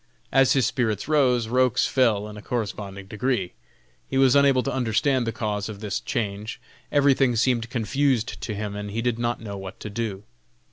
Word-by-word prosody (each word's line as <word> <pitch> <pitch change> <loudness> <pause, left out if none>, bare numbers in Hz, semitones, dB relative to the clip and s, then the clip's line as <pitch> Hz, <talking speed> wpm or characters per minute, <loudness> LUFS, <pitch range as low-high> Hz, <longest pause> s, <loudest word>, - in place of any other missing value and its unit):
As 135 -1 +5
his 135 -4 +3
spirits 110 -4 -1
rose, 130 -6 +3
Roch's 125 0 +2
fell 110 -6 +2
in 105 - -9
a 105 - -9
corresponding 100 -4 -4
degree. 105 -2 -1 0.6
He 135 - -1
was 135 -1 +5
unable 140 -2 +5
to - - -2
understand 125 +1 +1
the - - 0
cause 105 -2 -3
of 105 -2 -7
this 105 0 -2
change; 110 -2 -3 0.3
everything 135 -3 +3
seemed 120 -1 +1
confused 125 +1 0
to 110 - -4
him, 105 0 -4
and 105 0 -5
he 115 +3 -3
did 120 -1 0
not 120 -1 -1
know 100 -3 -6
what 95 -1 -8
to 105 - -6
do. 105 -3 -4
115 Hz, 185 wpm, -24 LUFS, 105-130 Hz, 0.6 s, As